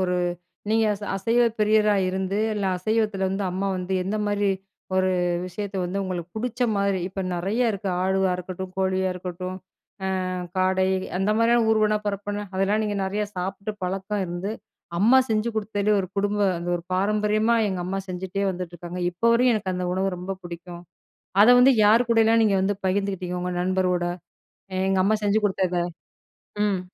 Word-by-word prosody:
ஒரு 180 -1 +1 0.5
நீங்க 225 0 +3
ச - - -9
அசைவ 230 +5 +2 0.2
பிரியரா 210 0 +4
இருந்து, 190 +1 -2 0.2
இல்ல 205 -1 -2
அசைவத்தில 210 0 0
வந்து 195 +1 -2
அம்மா 190 +2 -1
வந்து 180 +1 -3
எந்த 195 +3 -2
மாரி 205 -1 +1 0.5
ஒரு 185 0 +3 0.4
விஷயத்த 200 +2 -5
வந்து 185 +3 -2
உங்களுக்கு 180 -2 -4
புடிச்ச 245 +2 -3 0.2
மாரி, 200 -1 +1
இப்ப 195 +1 -5
நெறையா 195 +8 0
இருக்கு. 200 -1 -3
ஆடுவா 190 0 +2
இருக்கட்டும், 185 +1 -6
கோழியா 190 0 +1
இருக்கட்டும், 180 0 -5 0.7
அ - - -2 0.3
காடை 185 0 +2 0.3
அந்த 195 +2 +1
மாரியான 230 0 +4
ஊர்வன, 215 -1 +3
பறப்பன 205 0 -3
அதெல்லாம் 200 +3 +1
நீங்க 205 -1 -2
நெறைய 205 +2 -1
சாப்பிட்டு 195 +3 -4
பழக்கம் 195 +2 -2
இருந்து, 175 +4 -4 0.5
அம்மா 235 +8 +6
செஞ்சு 215 +1 +1
குடுத்தது 210 -1 -1
ஒரு 185 - -3
குடும்ப 205 +1 0 0.2
அந்த 170 +1 -5
ஒரு 170 - -8
பாரம்பரியமா 210 +3 +2
எங்க 190 -2 -2
அம்மா 195 +2 -2
செஞ்சுட்டே 185 +2 -3
வந்துட்ருக்காங்க. 175 -1 -6
இப்ப 175 - -28
வரையும் 245 +1 +4
எனக்கு 205 -3 -2
அந்த 180 0 -2
உணவு 190 +1 0
ரொம்ப 180 +2 -4
புடிக்கும். 175 0 -8 0.6
அத 220 - +7
வந்து 260 +2 +7
யார் 225 +4 +5
கூடயல்லாம் 225 0 +4
நீங்க 205 -2 +3
வந்து 200 +2 +1
பகிர்ந்துக்கிட்டீங்க? 190 -2 -1
உங்க 180 - -2
நண்பரோட, 180 -1 +1 0.8
எங்க 195 0 +2
அம்மா 215 +2 +3
செஞ்சு 205 +1 +3
குடுத்தத. 185 -3 0 0.9
ம். 195 -3 0
195 Hz, 160 wpm, -24 LUFS, 185-210 Hz, 0.9 s, அத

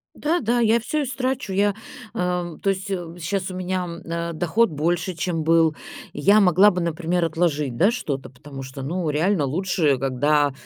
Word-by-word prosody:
Да-да, 250 -7 0
я 230 +1 +4
всё 300 +5 -2
истрачу. 260 -5 -2
Эм, 200 +1 +2 0.9
то 195 - +1
есть, 195 +1 -2
м, 175 -3 -4
щас 190 +2 -2
у - - -7
меня, 185 0 -2
м, 170 -1 -7
э, 170 0 -3
доход 175 +8 +2
больше, 170 +4 -1
чем 165 -2 -2
был. 165 -1 +3 0.4
Я 205 +2 +4
могла 195 +2 +6
бы, 180 - -2
например, 170 +1 0
отложить, 150 -6 0
да, 195 - +4
что-то, 140 - -4
потому 135 +1 -10
что, 130 +1 -8
ну, 165 +3 -2
реально 160 +2 +1
лучше, 160 -2 +1
когда, 145 +2 +2
175 Hz, 170 wpm, -23 LUFS, 155-195 Hz, 0.9 s, могла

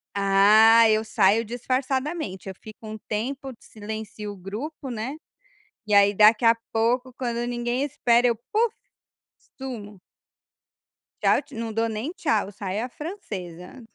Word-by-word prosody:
Ah, 210 +3 +6
eu 215 0 +2
saio 215 +1 +3
disfarçadamente. 255 - -3
Eu 190 - -5
fico 220 0 -12
um 215 - -6
tempo, 265 +5 -3
silencio 215 -1 -7
o - - -9
grupo, 255 - -7
né, 240 +5 -4 0.7
e 210 - +1
aí, 200 0 +5
daqui 215 +3 +5
a 230 0 +6 0.2
pouco, 245 +3 0
quando 240 -2 -3
ninguém 240 +2 -2
espera 245 -4 +2
eu, 235 - 0 0.2
puff, 450 +1 +2 0.9
sumo. 215 -7 -7 1.2
Tchau - - +3 0.2
não 225 -1 -4
dou 225 +1 0
nem 220 +8 -4
tchau, 225 - 0
saio 205 +3 -4
à - - -8
francesa. 220 - -8
225 Hz, 135 wpm, -24 LUFS, 210-255 Hz, 1.2 s, Ah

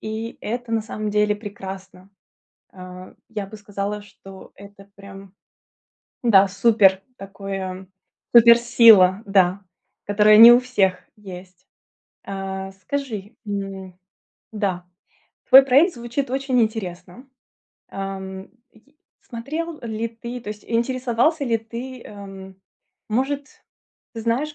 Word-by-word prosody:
и 220 +1 -6
это 240 +1 -5
на 225 -1 0
самом 215 -1 -5
деле 210 0 +1
прекрасно. 195 -2 -10 0.6
А, 185 0 -12 0.2
я 210 -3 -5
бы 215 - -11
сказала, 205 0 -5
что 195 -1 -15
это 200 0 -15
прям, 195 -1 -13 0.9
да, 200 -5 +5
супер 195 -1 +3 0.2
такое 195 -1 -7 0.5
супер-сила, 230 -4 +6
да, 195 -1 +2 0.5
которая 210 +1 +5
не 230 +2 +11
у 240 - +6
всех 195 -8 0 0.2
есть. 185 -3 -12 0.6
Э, 195 0 -6
скажи, 230 -5 -5
м, 195 -2 -6 0.6
да, 190 -4 -3 0.7
твой 265 +1 +10
проект 280 +7 +3
звучит 240 +3 -4
очень 265 -1 -1
интересно. 215 0 -5 0.7
Эм, 190 0 -7 0.2
й 280 +7 -26 0.2
смотрел 305 +7 -6
ли 230 0 -4
ты, 235 +2 -8
то 215 - -10
есть, 210 -1 -10
интересовался 255 +5 0
ли 230 -3 0
ты, 235 +3 -9
эм, 195 -2 -11 0.6
может, 275 +5 -3 0.5
знаешь 235 +7 -2
210 Hz, 110 wpm, -21 LUFS, 195-235 Hz, 0.9 s, не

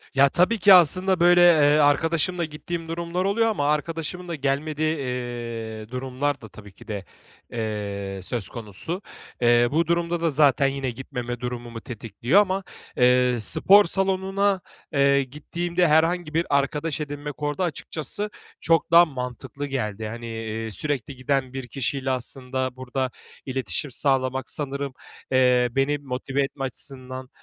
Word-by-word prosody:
Ya, 140 0 +6
tabii 185 +9 +2
ki 195 +1 +7
aslında, 185 +2 +5
böyle, 175 +1 +6
eee, 150 -4 +6
arkadaşımla 165 +4 +2
gittiğim 165 +2 -6
durumlar 170 +2 -2
oluyor 225 +3 +2
ama 145 -10 0
arkadaşımın 165 +3 -3
da 170 - -3
gelmediği, 150 +3 -1
eee, 120 -4 -5
durumlar 130 +2 -2
da 110 - -11
tabii 105 0 -13
ki 95 - -17
de, 100 -3 -5 0.5
eee, 100 -3 -4
söz 105 -2 -2
konusu. 120 - -3 0.4
Eee, 120 0 +5
bu 160 +2 +1
durumda 170 0 0
da 165 -2 +1
zaten 140 -1 +4
yine 135 -2 -2
gitmeme 120 -1 -6
durumumu 120 -2 -6
tetikliyor 120 - +1
ama, 195 -1 -1 0.3
eee, 125 0 +4
spor 200 - +6
salonuna, 195 +1 0 0.3
eee, 140 0 +4
gittiğimde 170 +6 -1
herhangi 160 +1 +2
bir 165 +2 +1
arkadaş 145 +2 0
edinmek 145 0 -6
orada, 145 +6 -1
açıkçası, 170 +4 -2 0.3
çok 165 0 +2
daha 170 +1 +8
mantıklı 130 +1 -6
geldi. 110 -6 -3
Hani, 115 +2 -7
iii, 110 0 -5
sürekli 135 - -2
giden 130 0 -1
bir 130 -2 -5
kişiyle 135 0 -2
aslında 130 0 -3
burada 130 0 -3 0.3
iletişim 130 - -3
sağlamak 130 -1 0
sanırım, 140 -2 -3 0.4
eee, 125 -1 +4
beni 135 +3 +1
motive 135 0 -2
etme 135 0 -4
açısından 130 -1 -4
140 Hz, 140 wpm, -24 LUFS, 125-165 Hz, 0.5 s, daha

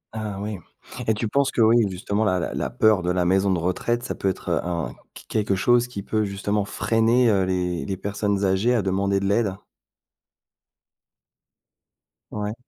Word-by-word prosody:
Ah 105 -3 -4
oui. 105 -1 -4 0.5
Et 110 - +3
tu 110 +2 -2
penses 140 +5 +1
que, - - 0
oui, 115 +1 +6
justement 100 +3 -2
la 95 -4 +1
la - - -3
la - - -2
peur 110 -3 +3
de 90 - -2
la 90 0 +1
maison 95 +2 +2
de 95 - +2
retraite, 90 +8 -1
ça - - -3
peut 95 - -1
être 95 - -5
un 85 -1 -2 0.3
q - - -12
quelque 105 -2 0
chose 120 +5 +3
qui 100 -5 -7
peut 110 +1 0
justement 100 +1 -1
freiner, 115 +3 +2
heu, 95 -2 +2
les 90 -2 -1
les 95 -1 -3
personnes 100 +1 -1
âgées 95 +6 +2
à 110 - +1
demander 100 +1 +1
de 100 - -3
l'aide? 100 -1 +1 2.8
Ouais. 105 0 -3
100 Hz, 180 wpm, -23 LUFS, 95-110 Hz, 2.8 s, oui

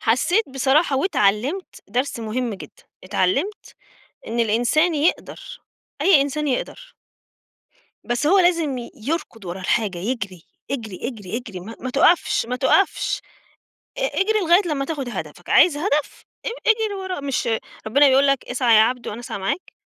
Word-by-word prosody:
حسيت 350 - +2
بصراحة 270 +3 +2
واتعلِّمت 265 - 0
درس 245 +3 -2
مهم 230 +1 -2
جدًا، 190 - -12 0.2
اتعلِّمت 200 - -1 0.5
إن 235 +1 -3
الإنسان 245 +10 +2
يقدر، - - -2 0.4
أي 360 -8 +6
إنسان 295 +2 -2
يقدر. - - -4 1.1
بس 240 +4 -1
هو 385 +6 +5
لازم 335 -7 +2 0.2
يركض 235 - -4
ورا 180 +1 -6
الحاجة، 195 -1 0
يجري 200 -4 -4 0.3
اجري، 225 -6 -4
اجري، 215 -5 -6
اجري 220 -7 -7
ما 220 +6 -9
ما 255 - -4
تقفش 285 0 +3
ما 250 +1 -2
تقفش، 290 +9 +2 0.8
ا - - -4
اجري 435 -3 +1
لغاية 350 0 +4
لمّا 285 -4 -1
تاخد 280 -5 -4
هدفك، - - -7
عايز 330 -5 +5
هدف؟ 300 -3 -1 0.2
اج - - -1 0.2
اجري 445 -2 +2
وراه، 375 -3 -4
مش 275 -4 -2 0.4
ربنا 280 +6 +5
بيقول 270 +1 +4
لك 275 -2 +1
اسعى 245 -2 +2
يا 215 - +8
عبد 245 +1 0
وأنا 215 - -5
أسعى 240 - -6
معاك؟ 195 - -3
270 Hz, 150 wpm, -22 LUFS, 225-335 Hz, 1.1 s, يا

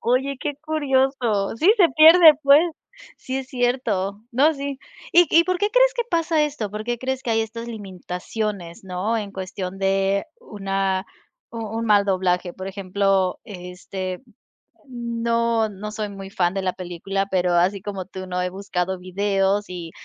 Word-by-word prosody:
Oye, 255 +3 0
qué 295 -1 -2
curioso, 265 -9 0
sí 355 - +5
se 365 -6 +6
pierde, 320 0 +9
pues, 280 +1 +7 0.6
sí, 260 +1 -4
es 265 - -6
cierto. 235 -6 -1
No, 280 +7 +4
sí. 280 -1 -5 0.3
¿Y 350 0 +7
y 335 +1 +6
por 365 0 0
qué 415 +2 +1
crees - - +4
que 480 - 0
pasa 330 -2 +2
esto? 280 -9 -4
¿Por 210 +1 -5
qué 240 +1 -2
crees 265 +1 -3
que 235 - -3
hay 225 - +2
estas 230 +1 -5
limitaciones? 195 -2 -5
¿No? 190 +5 -2
En 205 -3 -4
cuestión 190 0 -6
de 195 0 +1 0.2
una 195 -1 -2 0.4
un 230 -1 -5
un 225 +2 -3
mal 205 -1 +5
doblaje, 185 -2 0
por 190 +1 -8
ejemplo, 195 -1 0
este, 185 0 -6 0.7
no 235 -2 0
no 210 +1 -7
soy 215 -1 -4
muy 195 -1 -9
fan 180 -2 0
de 195 - -2
la 185 -1 -1
película, 185 +2 -3
pero 180 -2 +1
así 180 +3 +2
como 195 -3 -5
tú 190 0 -8
no 180 0 -2
he 180 - -1
buscado 190 -1 -3
videos 195 +2 0
y 175 -2 -7
205 Hz, 170 wpm, -22 LUFS, 190-255 Hz, 0.7 s, pierde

